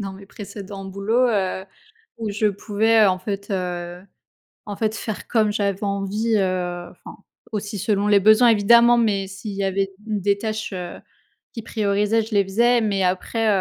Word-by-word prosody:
dans 195 -1 -5
mes 195 +1 -12
précédents 200 -2 -9
boulots, 205 +6 +1
heu, 190 -4 -1 0.5
où 220 -2 -3
je 205 +2 0
pouvais 215 +2 +2
en 185 -1 +1
fait, 200 +2 -5
heu, 180 -2 -4 0.6
en 205 - -5
fait 220 +1 -1
faire 215 -1 -6
comme 220 -3 +2
j'avais 200 -1 -1
envie, 205 +3 0
heu, 180 -2 -2
enfin - - -13 0.3
aussi 210 -1 -4
selon 205 0 0
les 205 -1 +5
besoins 215 +4 +6
évidemment, 235 +3 +5
mais 205 -4 +1
s'il 195 +2 -7
y 200 0 -3
avait 195 0 -1
des 205 -2 -1
tâches, 215 -1 -4
heu, 180 -1 -6 0.5
qui 230 - -6
priorisaient, 210 0 0
je 220 +1 -8
les 200 - +4
faisais 235 +5 +2
mais 200 -3 0
après, 190 +5 0
205 Hz, 170 wpm, -22 LUFS, 195-220 Hz, 0.6 s, besoins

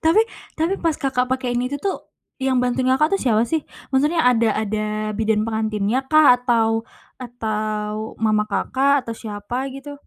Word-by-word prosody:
Tapi 325 +7 +5 0.4
tapi 330 +5 +1
pas 325 -3 0
Kakak 255 -2 0
pake 255 -1 -1
ini 245 +1 0
itu 285 - -2
tuh, 395 +3 -1 0.5
yang 260 -1 +2
bantuin 250 +1 0
Kakak 305 +8 +3
tuh - - -8
siapa 225 -4 +3
sih? 320 -2 0 0.3
Maksudnya 295 +5 +2
ada 230 -2 +4
ada 215 0 -1 0.3
bidan 220 -1 +1
pengantinnya 220 +2 -1
kah? 310 -4 +6
Atau 230 -2 +1 0.4
atau 215 -2 -3
mama 215 -1 +2
Kakak? 275 +1 +1
Atau 230 - -4
siapa 225 +5 -5
gitu? 285 +1 -10
245 Hz, 160 wpm, -21 LUFS, 220-275 Hz, 0.5 s, kah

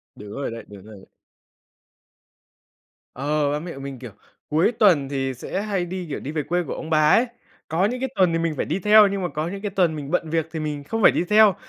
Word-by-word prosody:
Đúng 105 -1 -10
rồi 140 +3 -4
đấy, 115 0 -7
đúng 100 -2 -12
rồi 110 0 -12
ấy. 95 - -16 2.1
Ờ, 145 +2 0
ba 145 - -1
mẹ 170 +2 -7
của 135 - -10
mình, 135 -2 -7
kiểu, 125 -3 -9 0.4
cuối 160 +8 +3
tuần 180 - +3
thì 135 -1 -2
sẽ 130 +9 -4
hay 200 -4 -1
đi, 180 +1 -5
kiểu, 140 - -4
đi 140 - -6
về 155 -1 -2
quê 175 +4 -1
của - - -5
ông 160 - -7
bà 155 -1 +4
ấy. 235 - +5 0.4
Có 165 +5 +1
những 245 +4 -2
cái 265 +1 -2
tuần 180 -3 +3
thì 165 - +1
mình 165 -1 0
phải - - -1
đi - - -2
theo, 210 +2 +7
nhưng 200 0 -2
mà 180 - -1
có 155 +2 -2
những 195 +3 -6
cái 205 -1 -3
tuần 180 -5 +1
mình 145 -1 -6
bận 170 -2 0
việc 160 0 0
thì 160 - -4
mình 150 -2 -4
không 225 +10 -3
phải - - +7
đi - - 0
theo. 210 -2 +6
160 Hz, 255 wpm, -23 LUFS, 140-195 Hz, 2.1 s, theo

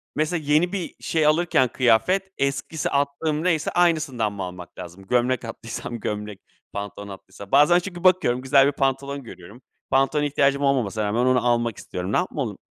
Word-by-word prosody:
mesela 155 +2 -1
yeni 165 +4 +3
bir 185 -4 -4
şey 160 -2 0
alırken, 155 -4 +3
kıyafet, 130 - +2
eskisi, 140 +2 -2
attığım 145 +2 -1
neyse 165 -4 +1
aynısından 150 -11 +1
mı 100 -1 -5
almak 90 -1 -9
lazım? 90 +1 -9
Gömlek 125 +1 +1
attıysam 115 +1 -6
gömlek, 105 -1 -5 0.3
pantolon 100 0 -6
attıysam. 95 +1 -12
Bazen 160 +5 +6
çünkü 175 -1 -8
bakıyorum 180 -10 +3
güzel 135 +1 +4
bir - - +2
pantolon 140 0 -2
görüyorum. 100 +2 -13 0.3
Pantolona 135 +3 +2
ihtiyacım 140 -1 +1
olmamasına 120 -7 +1
rağmen 115 +4 0
onu 130 -1 +2
almak 120 -2 +1
istiyorum. 90 +2 -5
Ne - - +3
yapmalım 135 - -3
135 Hz, 160 wpm, -23 LUFS, 110-155 Hz, 0.3 s, Bazen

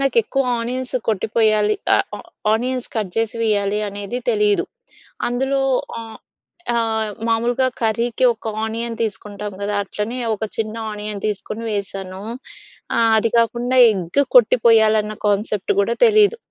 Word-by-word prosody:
నాకు 275 -3 0
ఎక్కువ 270 +5 -1 0.2
ఆనియన్స్ 255 +2 -4
కొట్టిపోయాలి. 215 0 +2 0.2
ఆహ్, - - +3
ఆ - - -9 0.4
ఆనియన్స్ 250 +2 -2
కట్ 215 -5 -2
జేసి 225 +1 0
వేయాలి 205 -2 +1
అనేది 205 +4 -5
తెలీదు. 210 -2 +2 0.6
అందులో 265 +3 0 0.4
ఆహ్, 225 -1 -9 0.6
ఆ - - +1 0.5
మామూలుగా 240 +3 +1
కర్రీకి 230 +3 +1
ఒక 220 0 -9 0.2
ఆనియన్ 230 +1 -3
తీసుకుంటాం 210 -1 -4
గదా. 205 +1 -2
అట్లనే 210 +5 -4 0.2
ఒక 215 - -6
చిన్న 220 0 -2 0.2
ఆనియన్ 210 -1 -5
తీసుకొని 215 +2 -4
వేసాను. 195 -2 -5 0.7
ఆ - - +1 0.2
అది 225 +1 +2
కాకుండా 240 +2 +1
ఎగ్గ్ 185 +3 -1 0.2
కొట్టిపోయాలన్న 220 -2 +5
కాన్సెప్ట్ 205 -1 0
గూడా 230 +4 +1
తెలీదు. 430 0 +4
220 Hz, 125 wpm, -20 LUFS, 210-240 Hz, 0.7 s, కొట్టిపోయాలన్న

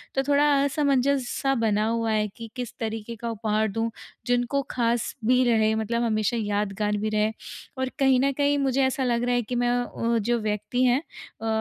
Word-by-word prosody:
तो 270 - +2
थोड़ा 285 0 +4 0.2
असमंजस 280 -2 +1
सा 270 -1 +2
बना 215 0 +2
हुआ 230 -1 0
है 215 -1 +1
कि 230 -1 -8
किस 245 -2 -5
तरीके 225 0 -4
का 235 +2 -5
उपहार 220 -1 0
दूँ 225 +2 -1 0.4
जिनको 245 +3 +1
ख़ास 235 -1 0
भी 255 +2 +4
रहे 220 -1 +3
मतलब 235 +2 -1
हमेशा 215 0 0
यादगार 210 0 -1
भी 215 +1 -1
रहे। 215 0 +1 0.5
और 260 0 -1
कहीं 265 -2 +4
न 275 +1 +2
कहीं 285 0 +2
मुझे 270 -1 +1
ऐसा 260 0 0
लग 240 -1 +1
रहा 245 0 +1
है 245 - +2
कि 250 - -1
मैं 245 0 +1 0.2
वो 230 0 +1
जो 235 +3 0
व्यक्ति 215 +4 -1
हैं 255 +1 +4 0.4
अ, 225 - -3
235 Hz, 195 wpm, -25 LUFS, 215-255 Hz, 0.5 s, थोड़ा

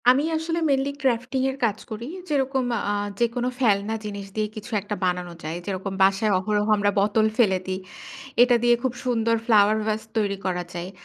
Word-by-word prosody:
আমি 260 +3 +5
আসলে 330 +1 -2
mainly 275 0 +2
crafting 255 0 0
এর 265 - -9
কাজ 215 -2 0
করি। 220 +2 -5 0.2
যেরকম 270 -2 +1 0.3
আ - - +1 0.3
যেকোনো 240 +1 0
ফেলনা 210 -3 +2
জিনিস 200 -1 -5
দিয়েই 215 -1 -1
কিছু 215 +2 -8
একটা 210 +1 -4
বানানো 180 -1 -1
যায়। 160 +2 -4
যেরকম 195 0 -3
বাসায় 195 +3 +3
অহরহ 210 +2 0
আমরা 205 0 +2
বোতল 210 +2 +3
ফেলে 200 -6 +4
দিই। 185 0 -2 0.6
এটা 245 0 +6
দিয়ে 240 0 +5
খুব 260 -2 0
সুন্দর 230 -2 +2
ফ্লাওয়ার 215 -2 +5
ভাস 215 0 0 0.2
তৈরি 200 -2 0
করা 180 -1 -1
যায়। 175 +1 -5
215 Hz, 180 wpm, -24 LUFS, 200-245 Hz, 0.6 s, এটা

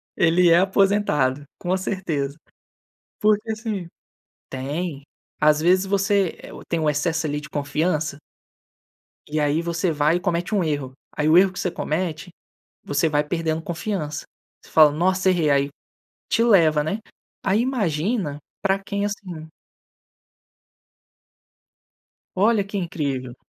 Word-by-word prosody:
Ele 175 +1 +4
é 170 - +7
aposentado, 190 -8 +2 0.2
com 180 +1 -1
certeza. 165 -7 -3 0.8
Porque 215 +1 +2
assim 215 -5 -4 0.6
tem. 145 +3 -4 0.4
Às 150 0 +5
vezes, 185 +4 +3
você, 195 -1 +1
eh, - - -11 0.2
tem 170 - 0
o 155 - 0
excesso 160 +2 0
ali 145 0 -2
de 150 - -11
confiança 150 +1 -1 1.1
e 155 +1 -1
aí, 150 +3 +1
você 170 +1 -1
vai 150 +1 +2
e 180 - -2
comete 175 +2 -1
um 195 - +2
erro. 145 -5 -2 0.2
Aí 150 - +1
o 160 +3 +7
erro 190 0 +5
que 185 - -8
você 180 - -1
comete, 165 +2 -3 0.6
você 145 +3 +1
vai 150 0 +2
perdendo 160 0 -2
confiança. 165 -3 -4 0.4
Você - - -18
fala: 155 -2 +7
"Nossa, 185 +5 +1
errei.". 170 -5 +2
Aí, 140 0 +2 0.6
te 230 - +3
leva, 165 -10 +4
né? 195 +8 -2 0.4
Aí, 195 +3 +2
imagina 195 - -1 0.2
pra 195 0 +2
quem 200 +1 -3
é - - +1
assim. 180 -6 -6 2.9
Olha, 210 +1 +3
que 200 +1 -6
incrível. 140 -8 -3
170 Hz, 135 wpm, -23 LUFS, 150-195 Hz, 2.9 s, é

